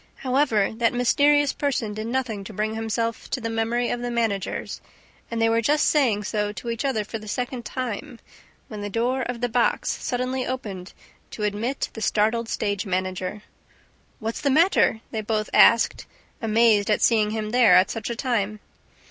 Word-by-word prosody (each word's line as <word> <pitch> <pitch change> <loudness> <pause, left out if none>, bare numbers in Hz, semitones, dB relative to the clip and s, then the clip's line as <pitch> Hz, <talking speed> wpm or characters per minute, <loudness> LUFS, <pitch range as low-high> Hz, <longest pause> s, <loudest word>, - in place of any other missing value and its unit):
However, 255 -6 +1
that 235 +1 +1
mysterious 285 +4 +3
person 255 -7 -1
did 215 +1 -5
nothing 235 -5 -2
to 215 - -8
bring 215 +2 -2
himself 225 +1 -3
to 265 - -2
the 230 -1 -4
memory 230 +2 0
of 240 - -2
the 245 - -3
managers; 225 -5 -2 0.5
and 230 - -3
they 225 - +3
were 230 0 +2
just 295 +6 +2
saying 240 -9 +2
so 210 0 -1
to 235 +4 -5
each 230 - -3
other 265 -6 0
for 220 +2 -6
the 215 - -11
second 245 +2 -4
time, 245 -1 -5 0.5
when 215 -2 -7
the 205 - -4
door 245 +5 0
of 245 -1 -4
the 245 - +1
box 240 0 +1
suddenly 255 +1 -2
opened 205 -8 -5 0.4
to 215 - -6
admit 215 +6 -2
the 220 - -8
startled 220 +2 +1
stage 205 -3 -1
manager. 185 +1 -3 0.7
"What's 225 +1 -4
the 280 - +1
matter?" 310 - +3
they 220 - -2
both 215 0 -2
asked, 230 +1 +5 0.3
amazed 220 -2 +3
at 210 - +2
seeing 215 -3 +3
him 215 0 -3
there 240 -7 +6
at 185 +2 +5
such 225 -1 -4
a 235 - -3
time. 215 -4 -1
225 Hz, 180 wpm, -24 LUFS, 210-245 Hz, 0.7 s, there